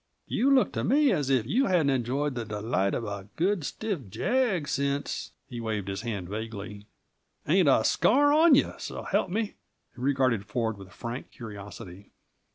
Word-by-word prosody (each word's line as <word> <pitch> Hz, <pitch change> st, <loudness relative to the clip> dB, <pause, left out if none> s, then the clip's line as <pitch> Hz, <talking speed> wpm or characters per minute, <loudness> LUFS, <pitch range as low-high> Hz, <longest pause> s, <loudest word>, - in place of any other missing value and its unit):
You 265 Hz, -, +1 dB
look 270 Hz, -2 st, +4 dB
to -, -, -2 dB
me 285 Hz, +1 st, +4 dB
as 145 Hz, -8 st, 0 dB
if 130 Hz, -5 st, +2 dB
you 250 Hz, -, +2 dB
hadn't 165 Hz, -7 st, +3 dB
enjoyed 135 Hz, +3 st, 0 dB
the 120 Hz, -2 st, -3 dB
delights 105 Hz, -2 st, -1 dB
of -, -, -2 dB
a 100 Hz, -2 st, -5 dB
good, 185 Hz, 0 st, +1 dB
stiff 150 Hz, -, -4 dB
jag 220 Hz, -, 0 dB
since 140 Hz, +1 st, -2 dB
" -, -, -49 dB
He 120 Hz, -, -5 dB
waved 110 Hz, -4 st, -3 dB
a -, -, -3 dB
hand 100 Hz, -7 st, -4 dB
vaguely. 105 Hz, 0 st, -6 dB, 0.6 s
"Ain't 170 Hz, 0 st, +4 dB
a 115 Hz, -, +4 dB
scar 290 Hz, -, +4 dB
on 315 Hz, -1 st, +7 dB
you, -, -, +2 dB
so -, -, -6 dB
help -, -, 0 dB
me!" 215 Hz, +5 st, 0 dB, 0.5 s
He 120 Hz, -, -10 dB
regarded 130 Hz, -5 st, +2 dB
Ford 110 Hz, 0 st, -1 dB
with 95 Hz, -1 st, -12 dB
frank 115 Hz, +5 st, -6 dB
curiosity. 100 Hz, -4 st, -10 dB
130 Hz, 175 wpm, -28 LUFS, -, 0.6 s, on